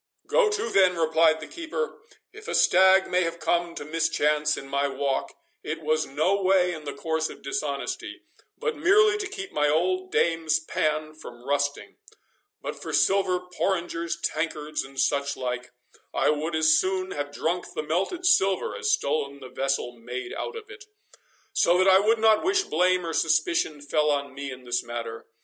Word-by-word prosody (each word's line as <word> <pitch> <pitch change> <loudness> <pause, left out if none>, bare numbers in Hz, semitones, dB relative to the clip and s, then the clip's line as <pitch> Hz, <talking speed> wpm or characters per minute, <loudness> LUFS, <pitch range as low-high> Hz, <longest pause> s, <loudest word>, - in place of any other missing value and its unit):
"Go - - +3
to, 415 - -2
then," 185 -3 +4
replied 160 0 +3
the 155 - -7
keeper; 340 +8 -5 0.3
"if 430 0 -12
a - - -2
stag 190 +1 +5
may 180 0 +1
have 165 -1 -2
come 170 0 0
to 145 - -6
mischance 150 -1 +1
in 135 - -8
my 140 +1 0
walk, 135 0 -2 0.3
it 160 +1 -5
was 155 +1 +1
no 170 +8 +1
way 185 -1 +3
in 155 -2 -8
the 145 - -4
course 160 +1 -1
of - - -12
dishonesty, 140 0 -4 0.3
but 460 - -2
merely 415 +6 +4
to 405 - -3
keep 395 -1 -7
my 150 0 +1
old 185 +4 0
dame's 165 -2 +2
pan 155 0 -2
from 120 -5 -12
rusting; 145 0 -1 0.7
but - - -6
for - - -6
silver 190 -2 +2
porringers, 170 -3 -1
tankards, 155 -2 -2
and 135 0 -10
such 140 0 0
like, 125 -1 -4 0.5
I - - +3
would 155 +2 -2
as 155 0 +5
soon 185 0 -1
have 145 0 -4
drunk 170 +4 -2
the 155 - -2
melted 195 - -2
silver, 340 - +3
as 445 -2 -1
stolen 145 - -1
the 130 -2 -10
vessel 135 -2 -1
made 120 +1 -6
out 470 - -5
of 450 -2 -8
it. 410 0 -11 0.7
So 175 +1 +3
that 185 +1 +3
I 190 0 +7
would 220 +3 +3
not 220 -1 +4
wish 385 +2 +2
blame 180 - +1
or 165 - -3
suspicion 155 -1 +1
fell 150 +1 +1
on 140 -2 -1
me 140 0 -6
in 130 -1 -9
this 125 0 -1
matter. 120 0 -6
160 Hz, 180 wpm, -26 LUFS, 145-190 Hz, 0.7 s, I